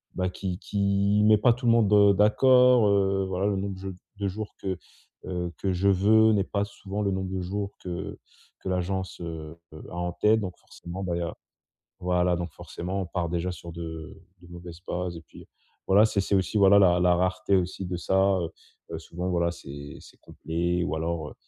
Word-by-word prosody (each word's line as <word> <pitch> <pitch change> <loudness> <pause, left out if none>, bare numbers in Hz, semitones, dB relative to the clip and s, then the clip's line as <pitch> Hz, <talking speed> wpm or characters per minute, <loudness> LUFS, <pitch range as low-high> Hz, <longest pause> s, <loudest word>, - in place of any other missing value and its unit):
bah, 90 0 0
qui 90 -1 -5
qui 100 0 +1
met 110 0 +6
pas 120 +4 +4
tout 125 +2 -7
le 115 - +5
monde, 110 -3 +3
heu, 100 -1 +6
d'accord, 125 +3 +5
heu, 95 -1 +2
voilà 95 +1 -1
le 100 -1 0
nombre 95 0 -3
dje 95 0 -5 0.3
de 100 0 -2
jours 105 +2 -6
que, 95 -2 -2 0.5
heu, 90 -1 -3
que 95 - -1
je 95 +2 +2
veux 110 +3 +5
n'est 100 -2 +2
pas 100 -1 -1
souvent 100 0 -6
le 100 -1 0
nombre 95 0 -2
de 95 -1 -2
jours 100 +2 -4
que 90 -2 -5 0.4
que - - -6
l'agence, 95 +1 -2
heu 80 -1 -7 0.2
heu, 75 - -10
a - - -9
en 90 0 -2
tête, 110 +4 +3
donc 90 -3 -5
forcément, 90 +3 -9
bah 90 -2 -2
il - - -2
y - - -3
a 85 - -4 0.7
voilà, 90 -1 +1
donc 85 -1 -5
forcement 95 +3 -5
on - - -5
part 85 -1 -2
déjà 85 +1 -1
sur 85 0 -9
de 80 +2 -7 0.3
de - - -14
mauvaises 85 -1 -10
bases, 90 -1 -3
et 85 - -9
puis 75 - -15 0.4
voilà, 100 +3 +6
c'est 105 -2 0
c'est 100 - -1
aussi, 95 +3 -1
voilà 100 0 +7
la 90 -3 +5
la 90 0 +4
rareté 95 +2 +1
aussi 95 +1 -2
de 90 0 -3
ça, 95 +3 +2
heu 85 -2 -3 0.4
heu, 80 - -3
souvent, 90 +2 -5
voilà, 85 -1 +1
c'est 70 -2 -9
c'est - - -17
complet 85 +2 -2
ou 85 - -2
alors, 80 -1 -3
heu, - - -14
95 Hz, 215 wpm, -26 LUFS, 85-100 Hz, 0.7 s, voilà